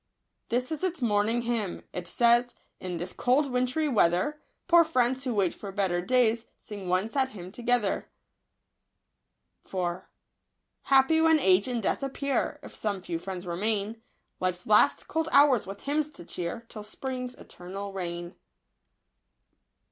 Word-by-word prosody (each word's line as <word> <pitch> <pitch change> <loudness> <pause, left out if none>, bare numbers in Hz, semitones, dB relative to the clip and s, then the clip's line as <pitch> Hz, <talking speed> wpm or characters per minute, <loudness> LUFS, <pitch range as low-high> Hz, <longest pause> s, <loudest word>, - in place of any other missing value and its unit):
This 250 +3 0
is 315 +2 -4
its 360 -3 -1
morning 225 0 +1
hymn. 230 -6 -2
It 180 -1 -5
says, 240 +3 +3
— - - -39
" - - -52
this 175 -1 -4
cold 270 +3 +2
wintry 255 +5 +1
weather. 220 - +2 0.3
Poor 345 -1 +7
friends, 260 -4 +1
who 245 -3 -1
wait 190 -4 +2
for 200 - -8
better 190 -3 0
days, 235 +1 +2
Sing 200 -4 -8
one 185 +3 +2
sad 265 +2 0
hymn 180 0 -8
together. 240 -2 0 2.7
Happy 275 +4 +4
when 320 0 +5
age 190 -6 +4
and 240 -3 -2
death - - 0
appear. 275 -1 -1
If - - -10
some 205 -3 -2
few 170 -3 -3
friends 185 +1 -6
remain, 210 +5 -2 0.4
Life's 180 -1 -2
last 210 0 +4
cold 320 0 -1
hours 280 -7 +5
with 195 +1 -7
hymns 300 +1 0
to 175 - -12
cheer. 175 +7 -5
Till 215 - -8
spring's 250 +3 -5
eternal 195 +3 -8
reign." 175 -1 -5
230 Hz, 145 wpm, -28 LUFS, 190-260 Hz, 2.7 s, Poor